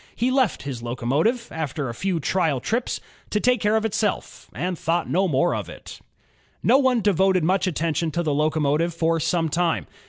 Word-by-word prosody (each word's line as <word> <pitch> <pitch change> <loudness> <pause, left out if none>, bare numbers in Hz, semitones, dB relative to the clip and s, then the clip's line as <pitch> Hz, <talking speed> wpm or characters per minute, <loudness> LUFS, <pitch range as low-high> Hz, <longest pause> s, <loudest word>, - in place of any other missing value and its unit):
He 245 +3 +1
left 255 - +1
his 135 -4 -5
locomotive, 135 - 0
after 150 -3 -3
a 120 - -4
few 185 +6 -1
trial 160 -2 0
trips, 235 - -2 0.3
to 210 - 0
take 250 +1 +2
care 210 +1 +2
of 220 0 +1
itself, 215 0 -2
and 180 0 -3
thought 165 +1 -1
no 190 +3 +1
more 165 +3 +2
about - - -4
it. - - -11 0.6
No 270 - +5
one 260 -4 +2
devoted 190 -3 +3
much 185 +3 +2
attention 165 -1 -1
to 170 +3 -2
the 155 -3 0
locomotive 155 +2 +1
for 165 0 +1
some 165 +1 0
time. 165 +1 0
170 Hz, 185 wpm, -23 LUFS, 155-205 Hz, 0.6 s, No